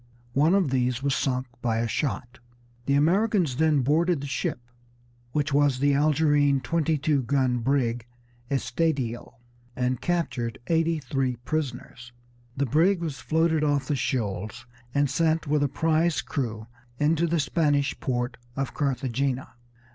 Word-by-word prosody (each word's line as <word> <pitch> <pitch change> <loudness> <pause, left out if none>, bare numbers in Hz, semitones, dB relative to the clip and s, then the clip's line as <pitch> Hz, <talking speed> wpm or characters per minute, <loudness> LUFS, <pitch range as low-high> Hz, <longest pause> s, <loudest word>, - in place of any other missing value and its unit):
One 155 +7 +4
of 185 -9 +2
these 125 -1 0
was 140 -1 +1
sunk 130 -2 0 0.2
by 115 -2 0
a 115 +1 0
shot. 125 -1 -3 0.5
The 140 - +3
Americans 175 - +2
then 155 -2 +3
boarded 165 +4 +2
the 140 - -6
ship, 135 -2 -2 0.7
which 145 +1 -1
was 145 -2 +3
the 140 +2 +2
Algerine 145 -1 +3
twenty 160 +4 0
two 145 0 +1
gun 130 -1 +1
brig 120 -2 0 0.4
Estedio, 135 -5 -1 0.4
and 125 -1 -1
captured 140 -10 -1
eighty 165 +1 +1
three 135 -3 -1
prisoners. 125 -2 -5 0.4
The 140 - +1
brig 170 - +3
was 155 -6 -4
floated 160 +2 +1
off 145 -3 +1
the 145 - 0
shoals 105 -7 -3 0.3
and 140 +2 +2
sent 160 +3 +1
with 150 0 +1
a 145 - +3
prize 160 +3 +1
crew 110 -6 -3 0.3
into 160 +4 +2
the 170 0 +1
Spanish 145 -2 +1
port 125 0 -2 0.2
of 135 -1 -3
Carthagena. 135 -1 -1
140 Hz, 140 wpm, -26 LUFS, 125-155 Hz, 0.7 s, One